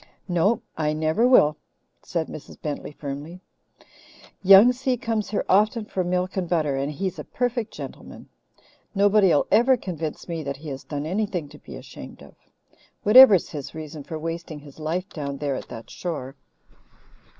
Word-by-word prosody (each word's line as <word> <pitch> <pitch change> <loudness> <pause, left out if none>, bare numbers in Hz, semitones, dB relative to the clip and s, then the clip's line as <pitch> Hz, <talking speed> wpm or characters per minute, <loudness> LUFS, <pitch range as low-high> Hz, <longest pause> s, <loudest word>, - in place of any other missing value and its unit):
"No, 200 +6 +1
I 150 -1 0
never 160 +9 +2
will," 155 - +5 0.4
said 165 -3 -2
Mrs. 155 - -10
Bentley 150 -1 -5
firmly. 145 +4 -7 1.0
"Young 195 +5 +8
Si 255 0 -1
comes 225 -4 -2
here 205 - -2
often 215 +3 +2
for 190 -3 -2
milk 180 +1 -1
and 185 -3 -2
butter, 155 -5 +1
and 140 +2 -2
he's 185 +5 -4
a - - -5
perfect 245 -3 -2
gentleman. - - -10 0.7
Nobody'll 200 -5 +4
ever 245 +4 +5
convince 165 -7 -5
me 165 -2 -4
that 140 -2 -5
he 150 +2 -9
has 135 -1 -6
done 145 -1 -5
anything 180 -3 -2
to - - -14
be - - -11
ashamed - - -11
of, - - -15 0.7
whatever's 210 -4 +8
his 145 0 -7
reason 155 -1 -7
for 160 - -6
wasting 165 -1 -6
his 145 +1 -15
life 170 +5 -2
down 140 -6 -5
there 145 -1 -2
at - - -7
that 115 - -10
shore." 145 -6 -5
170 Hz, 160 wpm, -24 LUFS, 150-205 Hz, 1.0 s, Young